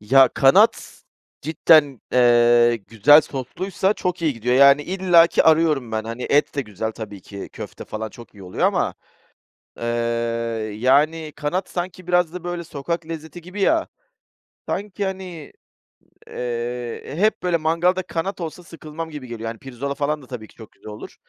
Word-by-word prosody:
Ya, 130 +5 +5
kanat 135 0 +3 0.4
cidden, 150 -3 +3
eee, 120 -1 +5
güzel 115 +8 +5
sosluysa 180 - -2
çok 180 -3 -3
iyi 155 -3 +2
gidiyor, 120 +2 -1
yani, 140 +2 +6
illaki 175 -1 +4
arıyorum 155 -7 +3
ben. 110 0 -2
Hani, 115 +2 -6
et 145 +1 +2
de 140 - -1
güzel 110 +1 -5
tabii 105 -3 -8
ki, 100 +1 -9
köfte - - -8
falan 110 0 -5
çok 120 0 -14
iyi 100 - -13
oluyor 90 - 0
ama, - - 0 0.8
ııı, 120 - -4 0.9
yani, 150 +7 +2
kanat 180 +6 -2
sanki 180 0 -5
biraz 180 -2 +2
da 180 -1 -8
böyle 175 -1 -4
sokak 160 +2 -4
lezzeti 160 +1 -7
gibi 185 +4 -9
ya, 325 +11 +2 0.8
sanki, 205 0 -3
hani, 185 -5 -6 0.8
eee, 120 0 -4
hep 215 0 +1
böyle 175 -2 +2
mangalda 170 +4 +1
kanat 180 +2 -4
olsa 170 +2 -6
sıkılmam 165 -1 -8
gibi 145 -5 -8
geliyor, 115 -1 -6
hani, 115 - -8
pirzola 135 +1 -5
falan 150 +1 -1
da 130 - -15
tabii 120 -4 -8
ki - - -22
çok 110 - -13
güzel - - -13
olur 105 - -10
150 Hz, 160 wpm, -22 LUFS, 120-170 Hz, 0.9 s, yani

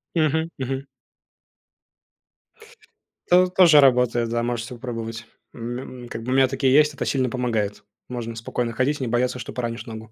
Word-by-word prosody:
Мгм 160 +1 +1
мгм. 135 +1 -4 2.4
То 180 +1 +6
тоже 175 -5 +6
работает, 125 -3 +3
да, 120 0 0
можете 120 0 -3
попробовать. 115 -2 -6 0.3
М, 120 +1 -7
м, - - -9
как 115 -1 -7
бы 125 - -3
у - - +2
меня 135 -1 +5
такие 130 0 +1
есть, 150 0 +5
это - - -4
сильно 130 -3 0
помогает. 110 -5 -2 0.2
Можно 115 -2 -5
спокойно 115 +1 -3
ходить 130 +5 0
и - - -3
не 120 - -2
бояться, 125 +2 0
что - - -7
поранишь 120 -1 -4
ногу. 110 -1 -9
125 Hz, 165 wpm, -23 LUFS, 115-135 Hz, 2.4 s, То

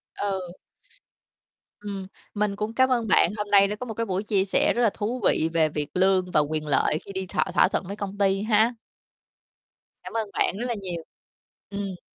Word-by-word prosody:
Ừ. 190 -3 -3 1.3
Ừm, 195 -2 -6 0.3
mình 205 -1 0
cũng 215 +2 -3
cám 260 +2 +3
ơn 235 -3 +1
bạn, - - +5
hôm 210 - -3
nay 200 -1 +7
đã 210 - -3
có 250 - -6
một 225 - -5
cái 230 +2 -2
buổi 190 0 -2
chia 200 -3 +1
sẻ 190 - +2
rất 240 - +1
là 225 - +5
thú 230 +3 -3
vị 160 - +2
về 160 -2 +3
việc 150 -1 -3
lương 185 -1 +2
và 150 - +4
quyền 155 +1 -1
lợi 150 +2 +2
khi 200 - -8
đi 190 0 -4
thỏa - - +1
thỏa - - +5
thuận - - -2
với 200 - -5
công 200 -1 -6
ty 195 -1 +2
ha. 220 +2 +3 1.3
Cảm - - -9
ơn 225 -2 -1
bạn 190 - +1
rất 240 - -3
là 240 - -1
nhiều. 175 -3 -5 0.7
Ừm. 200 -3 -5
200 Hz, 210 wpm, -25 LUFS, 185-215 Hz, 1.3 s, nay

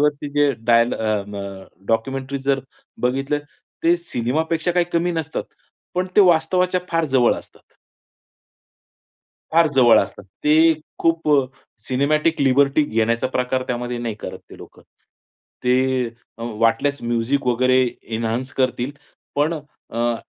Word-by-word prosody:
वरती 150 0 0
जे 145 0 +3 0.2
डायल 115 0 +4
अ, 110 -2 -1
म, 100 - -7 0.5
डॉक्युमेंटरी 135 +4 -1
जर 135 0 0 0.4
बघितलं 135 +4 0 0.4
ते 170 +1 +4
सिनेमापेक्षा 160 +2 -1
काही 175 -1 +2
कमी 170 +1 +1
नसतात, 160 -1 -3 0.5
पण 180 +1 0
ते - - +8
वास्तवाच्या 180 +1 +3
फार 165 -1 +1
जवळ 125 -2 +5
असतात. - - -14 1.8
फार 165 0 +5
जवळ 120 -3 +6
असतात. 100 0 -6
ते 155 - +3 0.2
खूप 165 -1 +1
अ, 140 -2 +5 0.4
सिनेमॅटिक 150 +4 +1
लिबर्टी 140 +2 +4
घेण्याचा 115 +1 0
प्रकार 130 0 -1
त्यामध्ये 120 0 -3
नाही 115 -2 -3
करत 105 - -8
ते - - -11
लोकं. - - -14 0.8
ते 130 0 +2 0.3
अ, 115 - -7 0.2
वाटल्यास 120 +4 +1
म्युझिक 120 +4 0
वगैरे 130 +1 +3 0.4
एन्हान्स 115 +3 -2
करतील, 130 0 0 0.5
पण 150 +3 +2 0.4
अ, 120 0 0
135 Hz, 125 wpm, -21 LUFS, 120-160 Hz, 1.8 s, ते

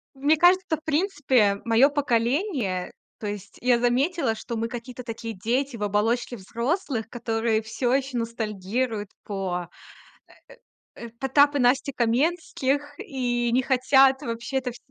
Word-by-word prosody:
Мне 290 +3 +2
кажется, 355 -1 +4
в 310 - -20
принципе, 290 - +2
моё 235 +5 +5
поколение, 250 - 0 0.3
то 210 - -5
есть 205 -2 -7
я 245 -1 +3
заметила, 255 +1 +1
что 230 +2 -6
мы 230 +1 -1
какие-то 245 +1 -8
такие 230 -1 -6
дети 235 +6 -1
в 210 - -4
оболочке 225 +4 0
взрослых, 235 - -3
которые 225 -2 -1
всё 225 +3 -1
ещё 265 -2 0
ностальгируют 220 -1 -3
по, 180 -4 -3 1.3
э - - -9
э - - -6
э, - - -12
Потап 285 +2 +4
и - - +1
Настя 255 +3 +2
Каменских 285 +2 0
и 240 -3 -1
не 255 - +3
хотят 265 +1 +4
вообще 235 +3 -3
это 255 -1 -2
вс 240 - -12
245 Hz, 145 wpm, -25 LUFS, 225-275 Hz, 1.3 s, моё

